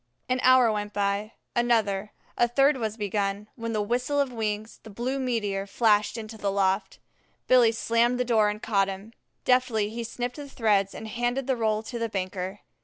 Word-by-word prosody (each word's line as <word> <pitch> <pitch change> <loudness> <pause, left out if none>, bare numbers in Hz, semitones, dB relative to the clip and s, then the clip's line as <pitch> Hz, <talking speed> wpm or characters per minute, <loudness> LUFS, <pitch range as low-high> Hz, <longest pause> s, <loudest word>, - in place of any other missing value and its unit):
An 255 0 0
hour 255 -3 +6
went 210 -1 -3
by, 205 +2 -1 0.2
another, 215 -4 +1 0.2
and 240 - +2
a - - -23
third 275 +3 +4
was 220 -2 -3
begun, 205 0 -2
when 230 -1 -4
with 210 -1 -1
whistle 250 +5 0
of 275 -2 +1
wings, 215 -1 -3
the 220 - -12
blue 245 +6 -3
meteor 210 -6 -1
flashed 210 +1 +2
into 220 0 -8
the 200 -1 0
loft. 195 0 0 0.5
Billy 245 -3 +5
slammed 230 +2 +1
the 250 - +1
door 220 -3 +3
and 210 +1 -5
caught 195 -3 +2
him. 195 +3 -7 0.3
Deftly 235 -5 +2
he 235 +1 -4
snipped 245 +3 -4
the 290 -1 -8
threads 205 -6 +1
and 220 - -7
handed 240 +4 -1
the 265 -1 +1
roll 220 -2 0
to 235 +1 -6
the 230 0 -1
banker. 190 0 -4
220 Hz, 190 wpm, -26 LUFS, 205-240 Hz, 0.5 s, hour